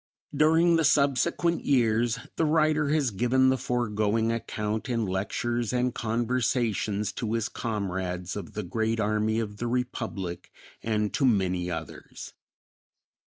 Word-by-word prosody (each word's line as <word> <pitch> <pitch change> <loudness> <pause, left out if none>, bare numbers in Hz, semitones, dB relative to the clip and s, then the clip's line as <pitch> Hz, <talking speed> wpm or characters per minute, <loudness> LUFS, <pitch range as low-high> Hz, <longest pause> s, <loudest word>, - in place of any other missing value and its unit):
During 165 +3 +4
the 165 - +2
subsequent 155 +4 +2
years 115 -3 +2 0.2
the - - +1
writer 155 -1 +2
has 145 -5 +1
given 125 +5 +3
the 130 - +3
foregoing 110 -2 0
account 110 0 -3
in 115 -2 0
lectures 115 +5 -2
and 125 0 0
conversations 115 -3 0
to 115 -2 -3
his 115 -2 0
comrades 95 -4 -3
of 100 -5 -7
the 105 - -3
Grand 110 +5 -1
Army 110 +1 +1
of 105 -2 -4
the 120 - -3
Republic 115 -7 -3 0.3
and 105 -2 -1
to - - 0
many 95 -7 +2
others. 80 -2 -7
115 Hz, 130 wpm, -27 LUFS, 105-125 Hz, 0.3 s, During